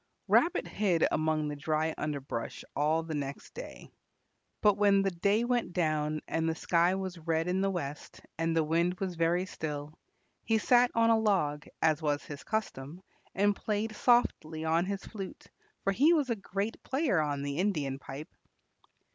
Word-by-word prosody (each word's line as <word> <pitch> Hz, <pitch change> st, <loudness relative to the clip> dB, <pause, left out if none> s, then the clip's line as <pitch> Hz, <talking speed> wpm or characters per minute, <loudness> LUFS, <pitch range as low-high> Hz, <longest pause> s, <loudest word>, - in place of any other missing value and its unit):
Rabbit 340 Hz, -, +3 dB
hid 190 Hz, -6 st, +2 dB
among 155 Hz, -1 st, +1 dB
the 150 Hz, -, -3 dB
dry 155 Hz, +2 st, 0 dB
underbrush 140 Hz, -6 st, -4 dB
all 155 Hz, +3 st, +2 dB
the 160 Hz, -1 st, -5 dB
next 140 Hz, -2 st, -5 dB
day. -, -, -9 dB, 0.7 s
But 210 Hz, -2 st, +4 dB
when 200 Hz, -1 st, +4 dB
the 195 Hz, -, +1 dB
day 200 Hz, +6 st, +1 dB
went 240 Hz, -6 st, 0 dB
down 155 Hz, -3 st, 0 dB
and 165 Hz, 0 st, 0 dB
the 160 Hz, -, -1 dB
sky 175 Hz, +2 st, +2 dB
was 190 Hz, -2 st, -4 dB
red 165 Hz, +1 st, 0 dB
in 185 Hz, +1 st, +1 dB
the 195 Hz, -, +2 dB
west 150 Hz, -6 st, -5 dB, 0.2 s
and 165 Hz, 0 st, 0 dB
the 160 Hz, -, +4 dB
wind 170 Hz, +3 st, +1 dB
was 190 Hz, -2 st, -2 dB
very 170 Hz, +2 st, +1 dB
still, 150 Hz, -4 st, -5 dB, 0.5 s
he 225 Hz, -, +2 dB
sat 245 Hz, +3 st, +4 dB
on 230 Hz, 0 st, +4 dB
a 225 Hz, -, +4 dB
log, 165 Hz, -9 st, +1 dB, 0.2 s
as 160 Hz, -1 st, +3 dB
was 145 Hz, -2 st, 0 dB
his 145 Hz, -1 st, -8 dB
custom, 180 Hz, -6 st, -4 dB, 0.3 s
and 205 Hz, +1 st, +3 dB
played 215 Hz, +1 st, -2 dB
softly 160 Hz, -11 st, +2 dB
on 165 Hz, +3 st, +2 dB
his 200 Hz, 0 st, -4 dB
flute, 195 Hz, -4 st, -8 dB, 0.4 s
for 195 Hz, -, +1 dB
he 290 Hz, -, +5 dB
was 290 Hz, -6 st, +1 dB
a -, -, +2 dB
great 200 Hz, +2 st, -4 dB
player 265 Hz, -, +1 dB
on 145 Hz, -2 st, -2 dB
the 140 Hz, 0 st, -3 dB
Indian 150 Hz, -9 st, 0 dB
pipe. 140 Hz, +3 st, -9 dB
170 Hz, 170 wpm, -30 LUFS, 155-205 Hz, 0.7 s, he